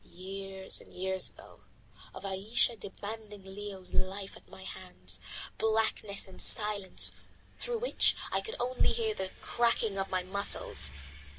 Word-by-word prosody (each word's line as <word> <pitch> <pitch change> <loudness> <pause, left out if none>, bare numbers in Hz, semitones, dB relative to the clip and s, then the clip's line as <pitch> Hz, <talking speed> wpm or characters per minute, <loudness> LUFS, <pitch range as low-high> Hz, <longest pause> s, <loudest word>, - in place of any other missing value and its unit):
years 190 +1 -3
and - - -16
years 190 +1 +3
ago; - - -14 0.5
of - - -8
Ayesha 200 +5 +3
demanding 205 0 -7
Leo's 195 -1 -7
life 195 +1 -1
at - - -16
my 190 - -11
hands. 100 - -2 0.4
Blackness 220 -2 +1
and 190 - -9
silence, 210 -3 +2 0.4
through 485 -1 -2
which - - +5 0.2
I - - +2
could 445 - -5
only 250 +1 +2
hear 445 -2 +1
the 190 - -2
cracking 230 -4 +2
of 195 - -1
my 185 -1 +1
muscles. 190 - +3
195 Hz, 135 wpm, -32 LUFS, 190-220 Hz, 0.5 s, which